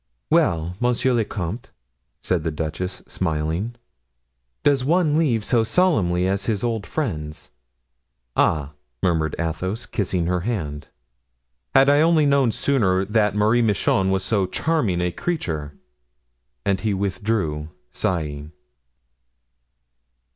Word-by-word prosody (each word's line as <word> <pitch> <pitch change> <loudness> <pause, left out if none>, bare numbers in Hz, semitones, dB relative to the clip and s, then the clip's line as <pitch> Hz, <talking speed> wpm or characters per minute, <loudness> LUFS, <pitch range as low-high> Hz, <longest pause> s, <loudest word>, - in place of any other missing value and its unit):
"Well, 85 +2 +2
monsieur 125 +1 +2
le 115 -2 +2
comte," 100 +2 -5 0.5
said 90 -4 0
the 80 - 0
duchess, 80 +4 -4
smiling, 80 +6 -2 0.9
"does 140 -3 +3
one 155 +1 +2
leave 125 -10 +2
so 120 -3 +3
solemnly 110 - +2
his 100 +3 -1
old 115 -6 -1
friends?" 80 - -4 0.8
"Ah," 75 -3 +2 0.3
murmured 80 -4 +1
Athos, 90 +6 -3
kissing 90 -5 -1
her 90 +1 0
hand, 85 -8 -3 0.9
"had 135 +1 +7
I 145 +1 +5
only 160 -2 +4 0.2
sooner 105 -7 +1
known 100 - -9
that 105 -2 +2
Marie 110 +3 +3
Michon 100 -3 +2
was 95 0 +1
so 95 -1 +1
charming 115 - 0
a 90 0 0
creature!" 80 - -3 0.9
And 100 -2 +1
he 105 -2 0
withdrew, 95 -5 -1 0.2
sighing. 75 -3 -2
95 Hz, 115 wpm, -22 LUFS, 85-120 Hz, 0.9 s, had